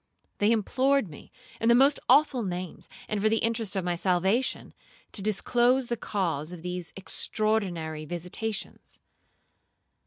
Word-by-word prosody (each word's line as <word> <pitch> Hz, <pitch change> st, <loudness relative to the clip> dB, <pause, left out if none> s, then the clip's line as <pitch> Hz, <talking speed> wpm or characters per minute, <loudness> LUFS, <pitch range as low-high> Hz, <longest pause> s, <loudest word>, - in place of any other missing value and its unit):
They 205 Hz, +2 st, +3 dB
implored 255 Hz, +2 st, +1 dB
me, 145 Hz, -, -13 dB, 0.3 s
in 225 Hz, -, +2 dB
the 235 Hz, -, +7 dB
most 275 Hz, +3 st, +4 dB
awful 270 Hz, -1 st, +5 dB
names, 180 Hz, -4 st, -5 dB, 0.2 s
and 210 Hz, -1 st, -2 dB
for 215 Hz, -, +3 dB
the 225 Hz, -, +2 dB
interests 225 Hz, -3 st, 0 dB
of 190 Hz, -2 st, -1 dB
my 175 Hz, -1 st, 0 dB
salvation, 190 Hz, +8 st, 0 dB, 0.4 s
to 205 Hz, -, 0 dB
disclose 240 Hz, +5 st, +2 dB
the 240 Hz, -, 0 dB
cause 170 Hz, -8 st, -2 dB
of 175 Hz, -2 st, -9 dB
these 180 Hz, -1 st, -5 dB
extraordinary 180 Hz, -4 st, -1 dB
visitations. 180 Hz, +7 st, -5 dB
205 Hz, 135 wpm, -27 LUFS, 180-230 Hz, 0.4 s, the